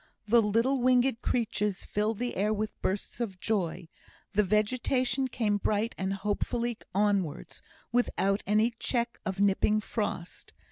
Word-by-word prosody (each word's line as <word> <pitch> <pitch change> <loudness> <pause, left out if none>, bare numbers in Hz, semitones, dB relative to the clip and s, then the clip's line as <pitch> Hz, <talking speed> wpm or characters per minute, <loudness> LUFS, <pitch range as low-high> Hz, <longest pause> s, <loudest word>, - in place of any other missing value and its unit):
The 230 +2 +5
little 230 +5 +2
winged 250 -1 +3
creatures 210 -4 -1
filled 210 +1 -1
the 245 +2 -2
air 205 +3 +1
with 215 0 -3
bursts 195 +5 -2
of 195 -6 -3
joy; 180 -7 -1 0.5
the 210 - +4
vegetation 250 +6 +1
came 220 -4 0
bright 210 +2 0
and 190 0 -2
hopefully 225 +4 -2 0.2
onwards, 200 -6 0 0.3
without 205 -4 +1
any 215 +3 +3
check 235 -1 -1
of 190 0 -3
nipping 205 +1 +3
frost. 210 -5 -4
215 Hz, 135 wpm, -29 LUFS, 200-240 Hz, 0.5 s, The